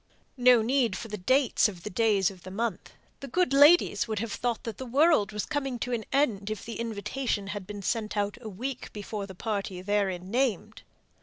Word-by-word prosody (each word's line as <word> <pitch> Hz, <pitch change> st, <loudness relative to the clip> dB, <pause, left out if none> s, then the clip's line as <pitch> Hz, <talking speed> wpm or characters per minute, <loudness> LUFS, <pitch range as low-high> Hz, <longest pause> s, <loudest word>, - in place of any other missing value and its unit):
No 245 Hz, -2 st, +6 dB
need 235 Hz, -5 st, +1 dB
for 225 Hz, -, -7 dB
the 210 Hz, -, -4 dB
dates 255 Hz, +4 st, +3 dB
of 180 Hz, -4 st, -11 dB
the -, -, -4 dB
days 205 Hz, -2 st, +2 dB
of 185 Hz, -2 st, -14 dB
the 185 Hz, -, -9 dB
month. 215 Hz, 0 st, -3 dB, 0.3 s
The 275 Hz, -, -7 dB
good 360 Hz, -3 st, +1 dB
ladies 290 Hz, -3 st, +6 dB
would 220 Hz, -1 st, -3 dB
have 220 Hz, +1 st, -3 dB
thought 240 Hz, +1 st, -2 dB
that 230 Hz, -3 st, -6 dB
the 260 Hz, -, -5 dB
world 275 Hz, -5 st, +3 dB
was 210 Hz, -1 st, -3 dB
coming 275 Hz, -4 st, -2 dB
to 245 Hz, +1 st, -3 dB
an 225 Hz, -2 st, -2 dB
end 220 Hz, -8 st, +1 dB
if 215 Hz, -, -5 dB
the 230 Hz, -, -6 dB
invitation 230 Hz, 0 st, -2 dB
had 205 Hz, -2 st, -5 dB
been 205 Hz, -1 st, -7 dB
sent 215 Hz, +1 st, -2 dB
out 205 Hz, 0 st, 0 dB
a 220 Hz, -, -6 dB
week 250 Hz, +6 st, -5 dB
before 205 Hz, -1 st, -5 dB
the 190 Hz, -, -10 dB
party 200 Hz, -2 st, -3 dB
therein 190 Hz, -2 st, -1 dB
named. 245 Hz, -5 st, -1 dB
220 Hz, 210 wpm, -28 LUFS, 200-250 Hz, 0.3 s, No